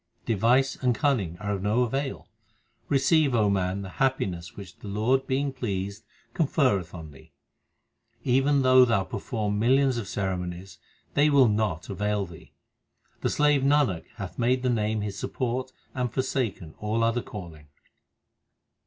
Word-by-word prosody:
Device 120 +5 +2
and 125 -2 +1
cunning 110 - 0
are 105 +2 -4
of 95 - -3
no 105 +5 +2
avail. 135 +3 -3 0.6
Receive, 140 0 +3
O 105 -3 +3
man, 95 0 -1
the 95 - -7
happiness 95 -11 -1
which 95 -3 -10
the - - -11
Lord 115 +7 +1
being 135 +1 0
pleased 100 -4 -4 0.3
conferreth 130 - +1
on 80 -3 -9
thee. 70 0 -17 0.9
Even 135 +2 +3
though 130 0 +7
thou 110 -5 +2
perform 105 +1 -3
millions 130 +2 +3
of 110 -4 -4
ceremonies, 90 -1 -4 0.3
they 145 +1 +4
will 140 -4 +6
not 105 -6 -1
avail 105 0 -1
thee. 85 -3 -14 0.7
The - - 0
slave 150 -2 +3
Nanak 140 - +2
hath 95 -1 -7
made 125 +2 +2
the 125 - +2
Name 110 -1 0
his 100 -1 -4
support 130 +1 -3 0.2
and 125 -2 -2
forsaken 120 - -2
all 110 +2 0
other 115 +1 +1
calling. 85 -9 -10
110 Hz, 145 wpm, -26 LUFS, 95-130 Hz, 0.9 s, though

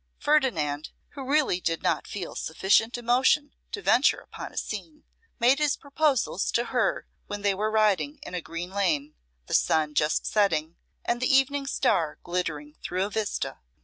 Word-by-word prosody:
Ferdinand, 165 - +1 0.2
who 275 - -8
really 285 -11 +2
did 165 -1 -1
not - - 0
feel 185 -4 -5
sufficient 205 +8 +1
emotion 255 +5 +2 0.2
to 430 - -5
venture 255 +4 +4
upon - - -9
a - - -16
scene, 310 -2 -5 0.4
made 255 +4 +4
his 300 -2 +2
proposals 280 - 0
to 235 - +2
her 245 -2 +1 0.2
when 205 0 -5
they 200 -1 +3
were 210 +3 -1
riding 200 -9 +2
in - - -9
a 180 - -2
green 165 +3 -6
lane: 160 -7 0 0.3
the - - -7
sun 155 -1 +2
just 150 +1 +1
setting, 170 -6 +1 0.3
and 240 +1 0
the 255 - +2
evening 275 +1 +3
star 170 - +1
glittering 155 -4 -3
through 185 +2 -1
a 205 - -6
vista. 215 0 -2
205 Hz, 165 wpm, -27 LUFS, 165-265 Hz, 0.4 s, venture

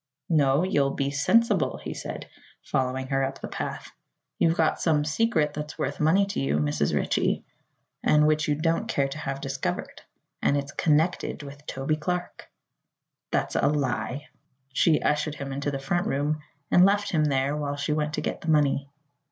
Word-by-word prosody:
"No; 145 -1 +3
you'll 140 -7 +1
be 140 0 -1
sensible," 230 - +2
he - - -4
said, - - -6 0.4
following 130 -1 -1
her 135 -1 +1
up 135 - -3
the - - -5
path. - - -5 0.5
"You've 165 0 +3
got 160 -1 +2
some 150 -3 +2
secret 155 -2 +1
that's 150 0 -6
worth 135 +1 -2
money 165 +6 +4
to 195 - -3
you, 70 +2 +1
Mrs. 75 -1 0
Ritchie, - - 0 0.6
and 150 0 +5
which 155 0 +2
you 150 - +2
don't 165 +2 0
care 140 -1 +1
to 135 - -7
have 135 -2 -3
discovered; 135 -10 -3 0.4
and 145 - +2
it's 140 0 -3
connected 155 +1 +1
with 140 +1 -11
Toby 135 +3 -1
Clark." 180 +3 -4 0.8
"That's - - -1
a - - +3
lie." 140 0 -1 0.5
She 160 +2 +4
ushered 150 0 +1
him 140 -1 -6
into 140 +1 -2
the 140 - -2
front 175 +6 -1
room 150 +2 0 0.3
and 180 - +7
left 200 +1 +3
him 155 -3 +2
there 140 0 +1
while 145 -1 -2
she 145 +2 -1
went 150 0 -1
to - - -2
get - - -3
the 165 - -4
money. 140 -2 +2
150 Hz, 175 wpm, -26 LUFS, 135-155 Hz, 0.8 s, and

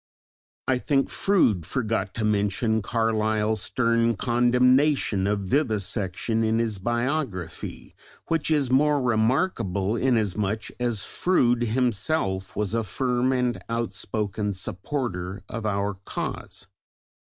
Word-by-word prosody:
I 130 -1 +2
think 135 0 +1
Froude 140 - +2
forgot 110 - -2
to 110 - -1
mention 105 +2 +1
Carlyle's 110 -1 0
stern 115 0 +1
condemnation 125 -2 +3
of 105 0 0
vivisection 105 - 0
in 110 0 +2
his 115 -4 -1
biography, 120 - -3 0.3
which 165 -2 0
is 145 -5 +2
more 145 +2 +4
remarkable 115 - +1
inasmuch 110 -4 0
as 120 -4 -1
Froude 120 -10 +2
himself 110 -4 0
was 105 0 -1
a 115 0 +1
firm 125 +4 0
and 125 -2 0
outspoken 105 -2 -2
supporter 95 -1 -4
of 115 -1 -4
our 100 0 0
cause. - - -5
115 Hz, 105 wpm, -25 LUFS, 100-125 Hz, 0.3 s, more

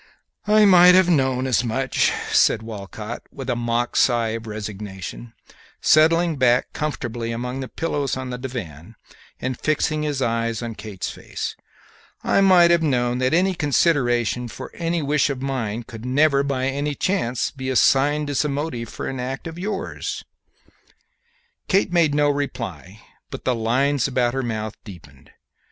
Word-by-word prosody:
"I 215 0 +6
might 180 -2 +8
have 185 -1 +5
known 130 -4 +1
as 125 -2 +2
much," 125 +2 +1 0.2
said 110 - +3
Walcott, 110 +1 -7
with 135 -2 -5
a - - 0
mock 120 0 -1
sigh 120 -3 +3
of 115 0 -5
resignation, 105 +1 -7 0.5
settling 165 +1 +4
back 125 -1 +2
comfortably 120 -6 -3
among 125 +3 -4
the 130 - -4
pillows 145 -4 -2
on 130 -1 -5
the 125 - -5
divan 110 - -7 0.4
and 130 -1 -3
fixing 155 0 0
his 150 -3 -2
eyes 115 -2 -1
on 115 -1 -4
Kate's 105 -3 -6
face; - - -6 0.7
"I - - +3
might 180 -3 +6
have 170 -1 +4
known 125 -5 +1
that 175 +9 +2
consideration 125 -5 +1
for - - -9
any 170 -1 -1
wish 145 +1 +2
of 135 -2 -4
mine 120 -5 -3
could 115 -1 -10
never 140 +2 +3
by 135 -2 -1
any 140 +2 -2
chance 130 -9 -1
be 130 -1 -5
assigned 145 +3 +3
as 140 - +1
the 150 - -1
motive 140 -5 -3
for - - -6
an 130 - -4
act 130 +4 -4
of 165 +1 -7
yours." 200 +1 -4 1.4
Kate 195 -2 +2
made 160 -4 +3
no 145 0 +3
reply, 115 - -4 0.3
but - - -8
the 130 - +2
lines 125 +4 +1
about 125 -2 0
her 135 - -1
mouth 110 -3 -3
deepened. 80 - -14
130 Hz, 155 wpm, -22 LUFS, 115-150 Hz, 1.4 s, might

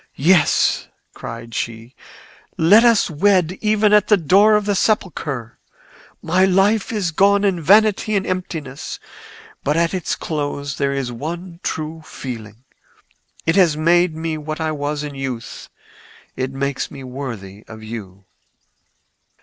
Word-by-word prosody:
"Yes!" 175 0 +3 0.3
cried 115 0 -8
she; 115 +2 -5 0.6
"let 200 +8 +6
us 230 -3 +4
wed 185 +1 +1
even 210 -1 +2
at 210 -1 +5
the 210 - +5
door 195 +6 +4
of 210 -1 +1
the 205 - +1
sepulchre. 155 - -1 0.6
My 180 +3 +2
life 195 +3 +2
is 200 -6 -1
gone 200 +4 +3
in 190 -4 +1
vanity 210 +4 +4
and 195 - 0
emptiness, 160 -6 -5 0.6
but 150 +3 0
at 170 +1 +1
its 185 -2 -2
close 145 -2 -4
there 140 0 0
is 135 -3 -3
one 170 +7 -6
true 160 +1 -4
feeling. 115 -6 -8 0.8
It 165 - +2
has 170 -6 +4
made 170 +1 +3
me 160 -1 -3
what 155 +1 -5
I 160 -1 -1
was 145 0 -3
in 145 -1 -6
youth: 135 -4 -6 0.7
it 130 0 -3
makes 135 0 -3
me 135 - -10
worthy 115 -7 -7
of 110 -1 -11
you. 100 -4 -9
160 Hz, 140 wpm, -20 LUFS, 135-190 Hz, 0.8 s, let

